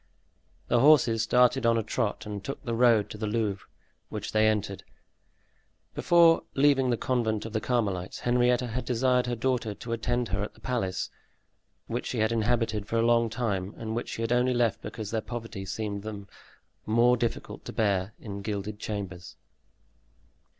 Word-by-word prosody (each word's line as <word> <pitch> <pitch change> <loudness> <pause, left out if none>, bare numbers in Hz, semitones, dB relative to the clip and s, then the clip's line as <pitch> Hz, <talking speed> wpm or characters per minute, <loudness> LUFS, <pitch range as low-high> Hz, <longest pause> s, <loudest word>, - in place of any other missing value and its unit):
The 120 - +3
horses 125 -5 +5
started 125 +3 +3
on 115 0 +3
a 115 - 0
trot 105 +1 -2
and 105 -1 -6
took 135 - -6
the 120 - -3
road 115 -3 +4
to 105 - -8
the 110 - -2
Louvre, 105 -3 -2 0.4
which - - -5
they 110 0 +4
entered. 105 -2 -1 1.1
Before 170 -1 +5
leaving 135 -2 +4
the 120 - +1
convent 110 -4 -1
of 115 - -7
the 110 - 0
Carmelites, 100 -7 -1
Henrietta 125 0 +2
had 125 +2 -3
desired 125 0 +1
her 120 - -1
daughter 120 -3 -1
to 115 - -8
attend 120 +1 -1
her 100 0 -1
at 105 - -5
the - - -19
palace, 105 -8 -2 0.7
which 120 +2 -3
she 125 - -3
had 110 +1 +2
inhabited 115 -2 0
for 115 - -1
a 115 - +3
long 115 -1 +3
time 105 -5 -2
and 110 0 -4
which 120 - -3
she 115 - -4
had 115 - -2
only 125 +1 +2
left 120 -2 +1
because 110 -3 -6
their 110 -1 0
poverty 115 -4 -6
seemed 100 +1 -3
to 110 - -5
them 100 -2 -8 0.6
more 120 +3 +4
difficult 120 -1 -3
to - - -5
bear 100 -1 0
in 100 -2 -7
gilded 105 0 -4
chambers. 95 -5 -6
115 Hz, 180 wpm, -28 LUFS, 105-120 Hz, 1.1 s, horses